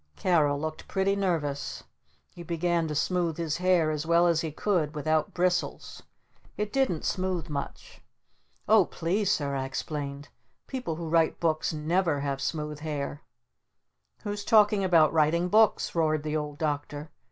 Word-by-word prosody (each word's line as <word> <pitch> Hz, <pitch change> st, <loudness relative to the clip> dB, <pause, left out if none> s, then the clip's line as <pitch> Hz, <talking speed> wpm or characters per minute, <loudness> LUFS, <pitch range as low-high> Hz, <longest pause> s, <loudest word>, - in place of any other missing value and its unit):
Carol 150 Hz, -6 st, +2 dB
looked 155 Hz, +1 st, -5 dB
pretty 195 Hz, 0 st, +1 dB
nervous. 160 Hz, -8 st, -2 dB, 0.5 s
He 175 Hz, -, -10 dB
began 170 Hz, -1 st, 0 dB
to 150 Hz, -, -4 dB
smooth 170 Hz, +1 st, 0 dB
his 165 Hz, -3 st, -2 dB
hair 180 Hz, -3 st, +2 dB
as 150 Hz, -1 st, -2 dB
well 170 Hz, +1 st, +3 dB
as 170 Hz, -2 st, +3 dB
he 160 Hz, -, -3 dB
could 160 Hz, -3 st, -1 dB
without 155 Hz, +1 st, 0 dB
bristles. 180 Hz, 0 st, -1 dB, 0.6 s
It 210 Hz, 0 st, -3 dB
didn't 265 Hz, -, 0 dB
smooth 185 Hz, -3 st, -2 dB
much. 140 Hz, -2 st, -6 dB, 0.7 s
"Oh 215 Hz, -3 st, +6 dB
please, 195 Hz, +4 st, -1 dB
Sir," 140 Hz, -2 st, 0 dB
I 135 Hz, -1 st, -2 dB
explained, 140 Hz, +1 st, -5 dB, 0.4 s
"people 255 Hz, -12 st, -4 dB
who 165 Hz, 0 st, -6 dB
write 165 Hz, 0 st, +2 dB
books 160 Hz, -2 st, 0 dB
never 160 Hz, 0 st, 0 dB
have 140 Hz, -1 st, -2 dB
smooth 150 Hz, 0 st, -3 dB
hair!" 150 Hz, -1 st, -4 dB, 1.0 s
"Who's 205 Hz, 0 st, -4 dB
talking 210 Hz, -2 st, +4 dB
about 165 Hz, -4 st, +4 dB
writing 165 Hz, +3 st, +2 dB
books?" 220 Hz, +2 st, +3 dB
roared 155 Hz, -2 st, +1 dB
the 155 Hz, 0 st, -2 dB
Old 150 Hz, -1 st, -3 dB
Doctor. 145 Hz, 0 st, -3 dB
160 Hz, 150 wpm, -28 LUFS, 150-180 Hz, 1.0 s, Oh